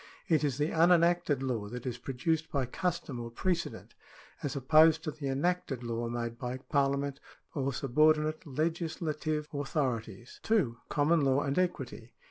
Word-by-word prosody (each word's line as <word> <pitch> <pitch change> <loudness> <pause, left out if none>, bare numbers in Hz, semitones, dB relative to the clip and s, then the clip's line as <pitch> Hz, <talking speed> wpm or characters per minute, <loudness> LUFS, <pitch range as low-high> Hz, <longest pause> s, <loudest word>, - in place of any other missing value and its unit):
It 160 -4 +3
is 140 -4 0
the 150 +2 0
unenacted 170 -3 +4
law 115 -6 -2
that 125 +2 -7
is 125 -1 -3
produced 155 +6 -1
by 140 -3 0
custom 150 -2 -3
or 120 0 -5
precedent, 170 +8 -2 0.5
as 145 0 -3
opposed 155 +4 +5
to 155 - -2
the 145 -1 -6
enacted 140 -2 -1
law 115 0 -2
made 115 0 -4
by 125 +1 -3
Parliament 140 0 0 0.3
or 135 -2 -1
sub 130 -1 -5
ordinate 155 +1 +4
legislative 155 0 -2
authorities. 130 -5 -3
2. 170 - +1
Common 155 +3 +3
laiv 135 +1 +2
and 140 +4 0
equity. 135 -10 -3
145 Hz, 150 wpm, -31 LUFS, 125-160 Hz, 0.5 s, opposed